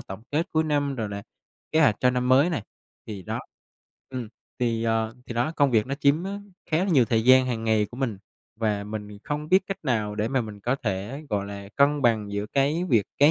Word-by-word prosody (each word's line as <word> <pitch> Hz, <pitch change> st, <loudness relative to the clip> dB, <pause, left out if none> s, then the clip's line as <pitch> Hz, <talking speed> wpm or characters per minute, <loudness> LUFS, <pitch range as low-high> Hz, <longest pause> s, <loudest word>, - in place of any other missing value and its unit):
tổng 95 Hz, +3 st, -9 dB
kết 155 Hz, +4 st, 0 dB
cuối 160 Hz, 0 st, +2 dB
năm 145 Hz, -2 st, 0 dB
rồi 110 Hz, -4 st, -3 dB
là, 100 Hz, 0 st, -5 dB, 0.5 s
kế 160 Hz, -, +4 dB
hoạch 110 Hz, -9 st, +5 dB
cho 125 Hz, -, +4 dB
năm 125 Hz, 0 st, -1 dB
mới 135 Hz, +7 st, +5 dB
này, 150 Hz, -, -2 dB, 0.4 s
thì 100 Hz, -3 st, -6 dB
đó. -, -, -3 dB, 0.7 s
Ừm, 125 Hz, -4 st, -5 dB, 0.3 s
thì, 115 Hz, -2 st, 0 dB
ờ, 115 Hz, 0 st, 0 dB
thì 120 Hz, -, -6 dB
đó 120 Hz, +7 st, 0 dB
công 140 Hz, -2 st, +4 dB
việc 110 Hz, -3 st, +3 dB
nó 135 Hz, -, -2 dB
chiếm 145 Hz, +4 st, +2 dB
á, 200 Hz, +1 st, -4 dB, 0.3 s
khá 155 Hz, -, +3 dB
là 180 Hz, -, +2 dB
nhiều 130 Hz, -7 st, +5 dB
thời 110 Hz, -1 st, +1 dB
gian 130 Hz, +1 st, +7 dB
hàng 115 Hz, -3 st, -2 dB
ngày 110 Hz, -2 st, +2 dB
của 120 Hz, -, -10 dB
mình 120 Hz, -7 st, -2 dB, 0.4 s
và 105 Hz, -2 st, 0 dB
mình 105 Hz, -1 st, -7 dB
không 150 Hz, +1 st, -3 dB
biết 190 Hz, +2 st, +4 dB
cách 195 Hz, -, -4 dB
nào 110 Hz, -6 st, 0 dB
để 105 Hz, +1 st, -1 dB
mà 130 Hz, 0 st, +1 dB
mình 105 Hz, -3 st, -7 dB
có 125 Hz, +6 st, 0 dB
thể, 110 Hz, +5 st, -4 dB
gọi 100 Hz, -2 st, -1 dB
là, 100 Hz, -1 st, -8 dB
cân 145 Hz, +1 st, +3 dB
bằng 110 Hz, -4 st, +2 dB
giữa 100 Hz, +1 st, -2 dB
cái 145 Hz, +8 st, +1 dB
việc 110 Hz, -7 st, +3 dB
cá 145 Hz, +2 st, +7 dB
120 Hz, 235 wpm, -25 LUFS, 105-145 Hz, 0.7 s, gian